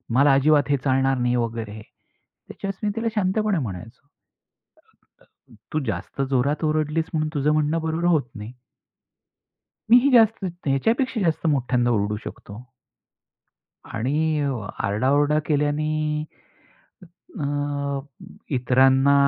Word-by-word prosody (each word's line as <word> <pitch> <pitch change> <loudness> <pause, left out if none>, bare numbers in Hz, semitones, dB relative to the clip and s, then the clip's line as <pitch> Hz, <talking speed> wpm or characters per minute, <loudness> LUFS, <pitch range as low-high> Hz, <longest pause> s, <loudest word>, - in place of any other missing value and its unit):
मला 140 +1 +5
अजिबात 145 +2 +3
हे 140 - +3
चालणार 135 0 +2
नाही," 125 0 +1
वगैरे. 115 -2 -3 0.7
त्याच्यावर 195 -1 -6
मी - - +2
तिला 225 0 -2
शांतपणे 210 0 +1
म्हणायचो. 115 +3 -7 1.7
"तू 155 - +1
जास्त 100 +7 -4
जोरात 140 +4 0
ओरडलीस 155 +1 0
म्हणून 155 -1 0
तुझं 145 0 +1
म्हणणं 155 +1 +1
बरोबर 160 +2 -2
होत 155 -8 +2
नाही." 105 +2 -8 1.4
मी 245 - +9
ही 280 +3 +2
जास्त, 225 -2 +6 0.3
ह्याच्यापेक्षा 225 - +1
जास्त 165 -3 0
मोठ्यांदा 125 -4 +1
ओरडू 105 -2 0
शकतो. 105 +3 -9 1.3
आणि 150 +6 0
अ, 130 -7 -2 0.2
आरडाओरडा 140 +8 +2
केल्याने, 150 +1 0 1.2
अ 145 -1 -2 0.6
इतरांना 130 +2 +4
145 Hz, 110 wpm, -23 LUFS, 125-155 Hz, 1.7 s, मी